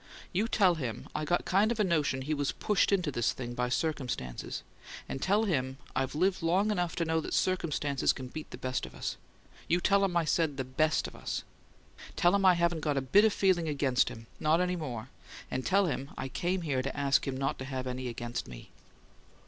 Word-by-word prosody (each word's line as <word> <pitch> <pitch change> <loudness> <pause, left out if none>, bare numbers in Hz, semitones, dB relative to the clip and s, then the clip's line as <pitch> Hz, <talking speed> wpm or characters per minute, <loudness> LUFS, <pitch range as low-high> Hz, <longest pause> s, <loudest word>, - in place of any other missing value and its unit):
You 205 +5 +1
tell 195 -5 +4
him 125 -9 -4
I 155 - -2
got 175 +3 +1
kind 205 +5 +3
of 235 - -2
a - - +5
notion 150 -7 +1
he 150 +3 -1
was 145 -2 -1
pushed 210 -1 +1
into 180 -6 +2
this 120 -3 +1
thing 120 -2 -6
by 125 0 -1
circumstances, 125 - -2 0.4
and 135 - -5
tell 205 +3 +3
him 130 -10 0 0.2
I've 130 +1 -1
lived 185 +4 +2
long 185 +6 +2
enough 175 -5 -1
to 170 - 0
know 160 0 +1
that - - -3
circumstances 150 -6 +1
can 130 - -6
beat 155 +4 -7
the - - -8
best 130 0 -2
of - - -14
us - - -3 0.5
you 175 +2 +3
tell 200 +2 +3
him 180 -3 +1
I 170 - +2
said 155 -3 +1
'the 130 - -1
BEST 155 +5 +1
of - - -7
us.' - - -4 0.7
Tell 175 +1 +4
him 200 -1 +3
I 185 -1 +7
haven't 170 -1 +1
got 145 -2 0
a - - +2
bit 195 - +5
of 220 - +4
feeling 185 -5 +2
against 140 -3 +2
him 115 0 -10
not 155 +2 +3
any 180 0 +1
more 125 -8 -5 0.4
and 130 - -2
tell 195 +5 +3
him 140 -4 -2
I 135 - -4
came 175 +6 -1
here 140 -5 0
to 135 +2 -4
ask 140 0 +2
him 130 -1 -2
not 135 +2 -1
to 130 - -5
have 130 -1 -4
any 130 0 -3
against 120 0 -4
me." - - -11
155 Hz, 220 wpm, -30 LUFS, 130-180 Hz, 0.7 s, I